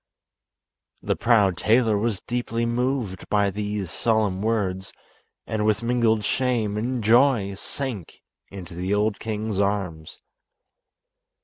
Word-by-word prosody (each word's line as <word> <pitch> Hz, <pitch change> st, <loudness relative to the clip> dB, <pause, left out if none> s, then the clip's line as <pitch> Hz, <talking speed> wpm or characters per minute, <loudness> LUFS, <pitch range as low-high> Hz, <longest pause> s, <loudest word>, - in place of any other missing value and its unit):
The -, -, 0 dB
proud 105 Hz, -7 st, +3 dB
tailor 115 Hz, 0 st, +3 dB
was 105 Hz, -1 st, -1 dB
deeply 120 Hz, -1 st, -2 dB
moved 120 Hz, -5 st, -2 dB
by 100 Hz, -1 st, +2 dB
these 105 Hz, -2 st, -3 dB
solemn 110 Hz, -5 st, 0 dB
words, 100 Hz, -4 st, -1 dB, 0.5 s
and 110 Hz, -1 st, -2 dB
with 110 Hz, +1 st, +1 dB
mingled 115 Hz, -3 st, +2 dB
shame 120 Hz, -5 st, 0 dB
and 120 Hz, +2 st, -2 dB
joy 115 Hz, -3 st, +4 dB
sank 110 Hz, -, -6 dB, 0.3 s
into 95 Hz, -3 st, -9 dB
the 90 Hz, +4 st, -1 dB
old 105 Hz, 0 st, 0 dB
king's 110 Hz, -2 st, -3 dB
arms. 95 Hz, -6 st, -2 dB
105 Hz, 115 wpm, -24 LUFS, 100-115 Hz, 0.5 s, joy